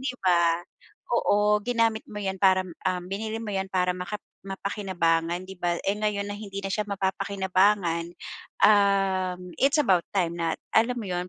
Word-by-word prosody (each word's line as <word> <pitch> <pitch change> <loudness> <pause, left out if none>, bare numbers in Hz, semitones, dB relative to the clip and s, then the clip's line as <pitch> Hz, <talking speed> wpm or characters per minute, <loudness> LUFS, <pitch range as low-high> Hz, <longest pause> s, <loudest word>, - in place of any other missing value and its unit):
'di 260 -1 -3
ba 170 -1 +3 0.5
oo, 210 -2 +3
ginamit 230 -2 +1
mo 210 - -9
'yan 190 -2 -3
para, 185 -1 +3 0.2
um, 180 -1 -2
binili 215 +4 -4
mo 225 -2 -5
'yan 190 0 -2
para 180 -1 +1
makap 180 +4 -5 0.3
mapakinabangan, 185 -3 -1
'di 190 - -9
ba? 175 -1 0
Eh, 195 - +1
ngayon 210 -1 -1
na 205 - -4
hindi 200 -2 -6
na - - -1
siya 210 +1 0
mapapakinabangan. 190 -2 +1 0.6
Um, 190 -3 +2
it's 275 +2 +4
about 195 -12 +4
time 175 -4 0
na 165 -1 -1 0.2
alam 235 +3 +3
mo 225 - -5
'yon? 180 0 -3
195 Hz, 165 wpm, -26 LUFS, 180-210 Hz, 0.6 s, it's